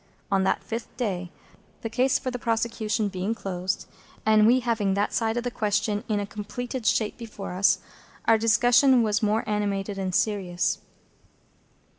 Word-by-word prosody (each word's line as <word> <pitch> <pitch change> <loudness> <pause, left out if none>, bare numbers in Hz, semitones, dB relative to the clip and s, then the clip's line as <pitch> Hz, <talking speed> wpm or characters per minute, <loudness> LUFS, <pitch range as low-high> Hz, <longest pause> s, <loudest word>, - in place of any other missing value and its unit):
On 195 -1 +3
that - - +1
fifth 230 +1 -6
day, 185 -7 -2 0.5
the - - -1
case 255 +4 +2
for 255 - -4
the 245 - -4
prosecution 225 -2 0
being 195 +3 -2
closed, 185 -3 -3 0.4
and 215 0 +5
we 255 +2 +5
having 220 -5 0
that 205 +1 0
side 225 0 0
of 240 - -1
the 245 - -2
question 210 -1 0
in 210 -1 +1
a 205 - -2
completed 215 +4 -5
shape 215 +1 +1
before 215 -5 -7
us, 190 +2 +4 0.5
our 225 -1 +5
discussion 245 +3 +5
was 210 -1 +1
more 220 +2 +1
animated 205 -1 -1
and 185 -2 -2
serious. 190 -5 0
215 Hz, 160 wpm, -26 LUFS, 200-235 Hz, 0.5 s, and